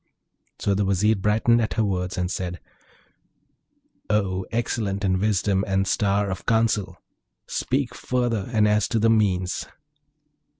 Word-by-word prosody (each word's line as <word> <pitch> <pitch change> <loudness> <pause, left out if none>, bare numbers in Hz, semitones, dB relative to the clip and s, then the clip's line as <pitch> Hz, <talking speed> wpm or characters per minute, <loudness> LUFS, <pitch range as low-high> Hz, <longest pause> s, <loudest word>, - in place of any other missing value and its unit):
So 100 - 0
the 100 +1 +1
Vizier 100 +3 +2
brightened 110 +4 +2
at 110 - -1
her 110 - +2
words, 95 -2 -2
and 90 0 -1
said, 90 -2 -4 1.5
'O 95 -3 0
excellent 110 -4 -1
in 95 -1 +1
wisdom 100 -1 +1
and 95 0 +1
star 100 -1 +1
of 95 - -6
counsel! 110 -5 +1 0.5
speak 135 -1 -2
further, 120 -4 -1
and 110 -3 +3
as 105 -1 +2
to 115 - -1
the 115 +1 +3
means.' 95 -4 +1
100 Hz, 135 wpm, -24 LUFS, 95-110 Hz, 1.5 s, and